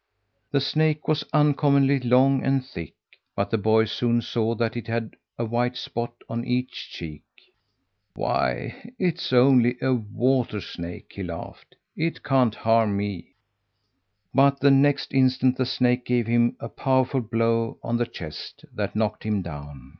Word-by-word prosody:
The 140 +2 +1
snake 155 +2 0
was 155 -1 +1
uncommonly 140 -2 +3
long 130 +2 +3
and 135 -1 +1
thick, 85 -11 -8 0.4
but - - -1
the 115 - +2
boy 110 +2 +3
soon 120 +2 0
saw 115 -1 -1
that 115 -1 -1
it 120 -1 -5
had 115 -1 -3 0.2
a 115 - -1
white 120 +2 -1
spot 120 0 -4 0.2
on 115 +1 -3
each 125 +1 -3
cheek. 75 -3 -8 0.9
"Why, 60 - -2
it's 175 -5 -1
only 125 -1 +5
a 130 - +1
water 120 0 0
snake," 85 -2 -8
he 100 - -7
laughed; 85 -3 -8 0.2
"it 165 +1 -2
can't 130 -5 +2
harm 115 -2 +2
me." 100 -3 -5 1.0
But 140 +1 +4
the 140 +1 +5
next 140 +1 +3
instant 130 -1 +3
the 130 - 0
snake 125 -1 +1
gave 120 -2 +1
him 120 +1 +2
a 115 - -5
powerful 130 +2 +1
blow 115 0 0
on 120 - -1
the 120 0 0
chest 75 -7 -9
that - - -3
knocked 110 -1 -1
him 105 -3 -1
down. 75 -5 -9
120 Hz, 155 wpm, -24 LUFS, 110-135 Hz, 1.0 s, only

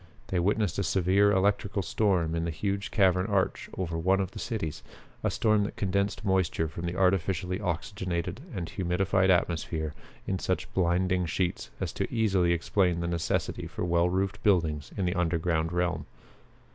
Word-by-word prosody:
They 90 - +1
witnessed 100 0 +1
a - - +1
severe 95 +2 +3
electrical 100 0 +1
storm 90 -7 +1
in 85 0 -1
the 85 - -1
huge 100 +6 -2
cavern 95 -2 +3
arch 100 -3 0
over 85 -3 -2
one 95 +3 +3
of 95 -1 -1
the - - -8
cities, 105 - -3 0.4
a - - +2
storm 110 -2 +2
that - - -6
condensed 100 +2 -1
moisture 95 -4 +1
from 85 +3 -5
the 85 - -3
artificially 90 -1 +1
oxygenated 90 +1 -3
and 90 -3 -3
humidified 95 +1 +1
atmosphere 80 -3 +1 0.3
in 95 -1 -1
such - - -2
blinding 90 0 +1
sheets 90 +2 -2
as - - -3
to - - -3
easily 95 -6 +2
explain 85 +1 +1
the 85 - -2
necessity 85 -1 -1
for - - -4
well 85 0 +2
roofed 95 +2 -1
buildings 80 -7 +1
in 95 - 0
the 90 - +1
underground 85 -2 0
realm. 90 -3 -1
90 Hz, 165 wpm, -28 LUFS, 85-100 Hz, 0.4 s, severe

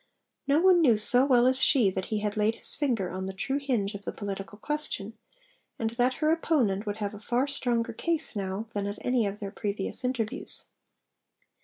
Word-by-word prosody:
No 285 +2 +3
one 365 -1 +5
knew 240 -9 +4
so 245 +5 +3
well 245 -3 +4
as 260 +1 +2
she 240 -10 +4
that 190 0 -3
he 215 -1 -3
had 210 0 -2
laid 215 +1 +1
his - - +9
finger 235 -11 -1
on 190 +1 -5
the 190 - -6
true 270 +8 -2
hinge 235 -8 -1
of 200 - -7
the - - -4
political 200 -1 -7
question, 225 -5 -4 0.6
and 225 -1 -2
that 245 +2 +1
her 310 0 +1
opponent 240 -12 0
would 205 0 -3
have 205 -1 -4
a 210 - -9
far 240 +4 0
stronger 240 -4 -1
case 320 +1 -2
now 195 +1 -3
than 200 -1 -2
at 205 +1 -5
any 250 -4 +1
of 200 +1 -6
their 200 -2 -6
previous 200 +3 -3
interviews. 245 -4 -2
225 Hz, 200 wpm, -27 LUFS, 205-260 Hz, 0.6 s, his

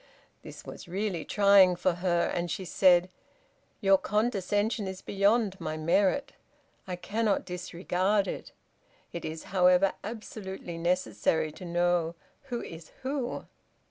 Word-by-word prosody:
This - - -11
was - - -9
really 185 -2 -2
trying 200 -3 +5
for 180 +1 +1
her, 175 -2 +2
and 175 0 -2
she 185 +4 -3
said, 180 0 +4 0.7
"Your 195 -2 +5
condescension 210 0 0
is 190 0 -5
beyond 200 0 +1
my 155 0 -3
merit. 190 - +2 0.6
I 180 - -3
cannot 210 +3 -1
disregard 185 +3 -1
it. - - -6 0.6
It 170 - -5
is, 160 0 -5
however, 180 +1 +5
absolutely 195 -5 -7
necessary 165 -2 0
to 180 - -10
know 175 -1 +1 0.3
'Who 245 -3 -4
is 165 -1 -10
who.'" 265 -2 -3
185 Hz, 125 wpm, -29 LUFS, 175-205 Hz, 0.7 s, trying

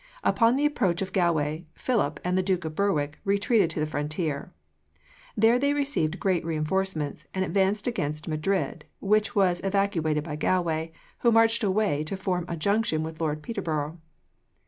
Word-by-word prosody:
Upon 230 +2 +4
the 285 +2 +1
approach 195 - +1
of 190 - -7
Galway, 165 -3 +1
Philip 180 - 0
and 180 +1 0
the 185 - +3
Duke 180 -2 0
of 160 - -4
Berwick 155 -6 0
retreated 200 -1 +2
to 165 - -4
the 155 - +1
frontier. 150 0 -3 0.9
There 225 +3 +5
they 280 +2 +2
received 275 - -1
great 185 -3 +1
reinforcements, 160 -1 -2
and 190 0 +1
advanced 195 +2 +1
against 155 -10 -2
Madrid, 155 0 -1
which 210 +1 +1
was 180 -3 +3
evacuated 190 -6 +1
by 150 -2 -5
Galway, 165 -2 0 0.3
who 235 - +4
marched 225 +1 +4
away 195 -7 +1
to 190 +5 -3
form 180 -2 -1
a 170 - -4
junction 200 -2 +1
with 160 +1 -6
Lord 155 -1 -1
Peterborough. 160 -7 -3
180 Hz, 160 wpm, -27 LUFS, 155-205 Hz, 0.9 s, There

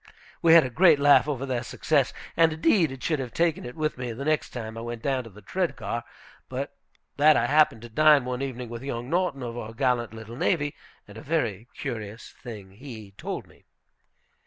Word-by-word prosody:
We 165 -1 +6
had 165 - +8
a 130 - -4
great 165 +4 +6
laugh 145 +1 +5
over 135 -3 -2
their 125 -3 -1
success. 140 +3 +1 0.2
And, 165 -1 +5
indeed, 160 0 +3
I 135 - -7
should 155 +2 -1
have 125 -3 -6
taken 170 -2 +1
it 125 - -7
with 155 -4 -2
me 125 -1 -3
the 135 +5 -6
next 155 0 +1
time 110 -2 -6
I 115 - -6
went 120 -1 -6
down 135 -2 0
to - - -9
the 105 +1 -15
Tredegar, 165 - -2 0.5
but - - -4 0.4
that 150 +1 +6
I - - +2
happened 145 -6 +3
to 120 - -9
dine 150 +2 +5
one 125 0 -3
evening 125 -2 -4
with 115 0 -6
young 125 -2 -5
Norton 170 -7 0
of 120 -1 -5
our 115 -2 -6
gallant 125 -3 +1
little 115 +1 -9
navy, 145 +1 0 0.3
and 105 +2 -10
a - - -10
very 120 - -1
curious 110 -5 -6
thing 105 -6 -9
he 110 -2 -10
told - - -5
us. - - -22
130 Hz, 205 wpm, -26 LUFS, 115-150 Hz, 0.5 s, had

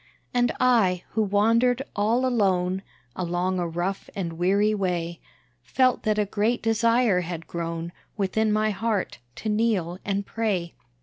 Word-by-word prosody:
And 245 -1 +2
I, 220 -8 +3
who 220 - 0
wandered 230 +5 +3
all 225 +5 +2
alone, 190 -6 +1 0.3
Along 180 +1 -1
a 175 - -1
rough 175 +4 -3
and 175 -4 -3
weary 200 +5 +2
way, 175 -4 -2 0.4
Felt 255 - +2
that 215 -1 0
a 210 - +2
great 220 +4 0
desire 230 -3 +3
had 170 -1 -5
grown 170 0 -4 0.3
Within 215 +2 +1
my 215 0 +2
heart, 215 -1 -2 0.2
to - - -6
kneel 210 -5 0
and 200 0 -1
pray. 195 -7 -2
205 Hz, 140 wpm, -25 LUFS, 180-225 Hz, 0.4 s, I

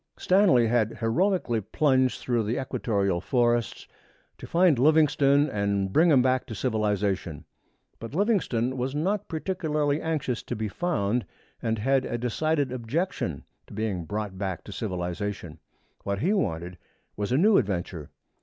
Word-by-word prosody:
Stanley 180 - +4
had 115 -1 +1
heroically 120 - +1
plunged 130 +3 +1
through 120 -2 0
the 110 +3 -2
equatorial 100 -8 -1
forests 120 0 0 0.5
to - - -9
find 170 -6 +3
Livingstone 145 -1 +4
and 100 -3 -1
to - - -11
bring 165 - +4
him 135 -5 +5
back 130 0 +1
to 110 - -6
civilization. 105 - -1 0.5
But 115 +5 -8
Livingstone 145 - +1
was 130 +3 -2
not 190 +7 -1
particularly 155 -4 -1
anxious 150 -7 -2
to 125 - -5
be 110 -1 -3
found, 120 - -1 0.4
and 115 -2 -1
had 135 +4 +1
a 120 - -3
decided 140 +4 0
objection 125 - -3 0.2
to - - -11
being 100 -6 -2
brought 105 0 -4
back 95 -3 -3
to - - -10
civilization. 90 -3 -4 0.4
What 100 0 -2
he 180 - +1
wanted 90 - -2 0.4
was 105 +2 -3
a 130 - +3
new 200 +6 +5
adventure. 90 - -3
120 Hz, 145 wpm, -26 LUFS, 100-150 Hz, 0.5 s, him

